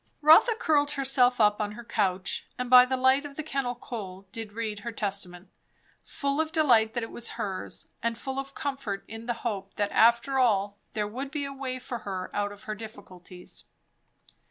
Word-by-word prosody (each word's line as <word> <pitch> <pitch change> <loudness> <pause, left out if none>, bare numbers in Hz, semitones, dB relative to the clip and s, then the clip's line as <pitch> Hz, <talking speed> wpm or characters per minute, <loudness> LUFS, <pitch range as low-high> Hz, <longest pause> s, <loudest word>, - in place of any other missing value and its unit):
Rotha 330 +10 +7
curled 295 -9 +2
herself 260 -3 +2
up 210 -1 +4
on 210 0 -2
her 235 +3 -9
couch, 195 -4 -1
and 250 0 -4
by 250 0 +10
the 260 +1 -1
light 260 +2 +4
of 285 -1 -8
the 310 - -4
kennal 275 -5 -2
coal 195 -6 -7
did 225 -2 -7
read 215 -2 -3
her 235 +3 -5
Testament; 195 -4 -3 0.5
full 280 +2 -1
of 320 0 -3
delight 240 -9 +4
that 240 - -1
it 225 - -6
was 235 - -4
hers, 200 -5 -5
and 230 -1 -1
full 265 +2 -4
of 275 0 -7
comfort 270 -9 -3
in 225 +1 -9
the 240 - +1
hope 195 -4 -3
that 205 -1 -1
after 235 +4 +4
all 205 -4 +2
there 210 -1 -1
would 260 +6 -5
be 290 -1 -3
a 275 - -5
way 265 -2 -4
for 250 -1 -6
her 190 -3 -5
out 205 0 -1
of 205 +1 -13
her 215 - -4
difficulties. 185 - -10
235 Hz, 195 wpm, -28 LUFS, 205-270 Hz, 0.5 s, by